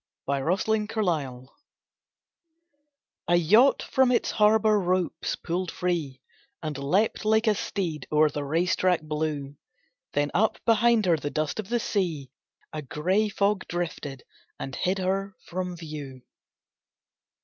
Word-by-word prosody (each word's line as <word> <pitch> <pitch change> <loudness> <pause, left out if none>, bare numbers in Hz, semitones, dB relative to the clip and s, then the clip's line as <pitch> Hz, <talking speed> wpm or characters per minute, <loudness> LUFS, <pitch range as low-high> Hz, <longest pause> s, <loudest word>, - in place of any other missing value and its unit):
A - - 0
MARINE 210 +8 0
ETCHING 145 - -1 1.8
A 175 - +4
yacht 215 - +5
from 265 -1 +2
its 245 - +1
harbour 215 0 +4
ropes 185 -1 -1
pulled 180 +1 -3
free, 165 -8 -2 0.4
And 155 -2 -3
leaped 165 +14 0
like 220 +1 +3
a 215 - +4
steed 170 -8 -3
o'er 155 0 +4
the 145 +1 -3
race 165 +6 +1
track 180 -3 +1
blue, 150 -2 -3 0.6
Then 145 0 0
up 215 +4 +2
behind 230 -1 +4
her 170 -3 +3
the 145 - -4
dust 155 +6 -2
of 210 -2 -5
the 240 0 +1
sea, 165 - -2 0.4
A 155 - -4
gray 185 - 0
fog, 200 0 0
drifted, 160 -6 -4 0.4
and 135 - -5
hid 185 +2 0
her 195 +1 -1
from 180 0 -4
view. 145 -6 -8
175 Hz, 135 wpm, -26 LUFS, 150-210 Hz, 1.8 s, yacht